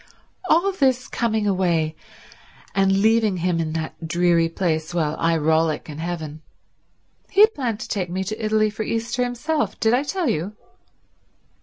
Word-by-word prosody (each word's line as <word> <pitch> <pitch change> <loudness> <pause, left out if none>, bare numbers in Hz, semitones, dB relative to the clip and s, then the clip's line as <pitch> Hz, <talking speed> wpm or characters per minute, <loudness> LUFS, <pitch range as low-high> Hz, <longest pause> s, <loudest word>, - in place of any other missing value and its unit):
"All 355 +5 +4
this 260 -8 +1
coming 220 -2 -1
away 170 -5 +1 0.8
and 195 +1 +2
leaving 220 -3 +3
him 175 -1 0
in 155 -1 -2
that 160 0 -5
dreary 170 0 +2
place 165 -1 -2
while 155 -3 0
I 165 0 +2
rollick 160 0 +1
in 150 0 -7
heaven. 160 -2 -5 0.9
He 400 - +3
had 435 +1 +7
planned 235 -6 -2
to - - -5
take 185 -4 -2
me 185 +2 -2
to 215 +3 -5
Italy 215 0 +2
for 215 - -6
Easter 230 +3 -1
himself. 270 +6 -2
Did 225 0 +3
I 250 - +3
tell 345 +3 -2
you?" 170 +7 -1
190 Hz, 160 wpm, -22 LUFS, 165-230 Hz, 0.9 s, had